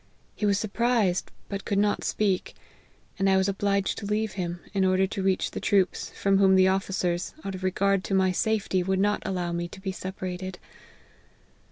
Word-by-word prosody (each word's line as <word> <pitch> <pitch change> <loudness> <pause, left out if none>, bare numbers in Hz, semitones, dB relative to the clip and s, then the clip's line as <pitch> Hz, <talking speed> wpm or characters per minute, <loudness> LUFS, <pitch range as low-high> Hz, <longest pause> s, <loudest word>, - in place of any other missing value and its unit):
He 210 - 0
was 200 -1 +3
surprised, 215 -3 +1 0.2
but 200 0 -5
could 200 - -1
not 205 0 +1
speak; 195 -3 0 0.6
and 195 0 +3
I 190 - +4
was 190 0 +2
obliged 200 0 0
to 205 - -6
leave 215 0 0
him, 175 -2 -4
in 195 -1 +2
order 185 0 +3
to 195 +1 -4
reach 190 -1 +1
the - - -4
troops, 195 -2 +1
from 195 0 +3
whom 190 -1 +5
the 185 0 +6
of 190 0 +1
ficers, 180 -2 -2
out 195 - -3
of 185 - -7
regard 195 +1 +1
to 195 - 0
my 190 -1 +3
safety, 205 -1 0
would 190 +1 0
not 205 +2 +1
allow 180 -2 -2
me 170 0 -2
to 185 - -12
be 190 0 -3
separated. 185 -1 -5
190 Hz, 195 wpm, -27 LUFS, 185-200 Hz, 0.6 s, the